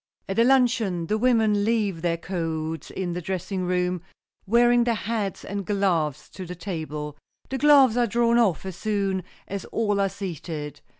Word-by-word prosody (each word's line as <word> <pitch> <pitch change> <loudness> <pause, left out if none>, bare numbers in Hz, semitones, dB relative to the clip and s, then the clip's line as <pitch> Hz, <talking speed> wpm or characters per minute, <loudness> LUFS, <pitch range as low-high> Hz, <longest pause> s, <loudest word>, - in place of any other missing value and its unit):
At 195 +3 -1
a - - +7
luncheon 235 -9 +2
the 215 +6 0
women 220 -4 +3
leave 210 -6 0
their 170 -1 0
coats 165 -3 -4
in 180 -2 -3
the 180 - -4
dressing 185 +1 -3
room, 180 -1 0 0.5
wearing 240 +2 +5
their 235 -1 +1
hats 210 -2 -3
and 200 0 -4
gloves 170 -7 0
to 190 - -8
the 180 0 -7
table. 155 -5 -5 0.3
The 265 - -3
gloves 280 -5 +6
are 240 -1 +3
drawn 235 +1 +3
off 195 -7 +2
as 190 -2 -5
soon 195 -1 -1 0.3
as 200 -1 -4
all 205 -3 0
are 195 - +2
seated. 165 -6 -6
195 Hz, 170 wpm, -25 LUFS, 175-225 Hz, 0.5 s, a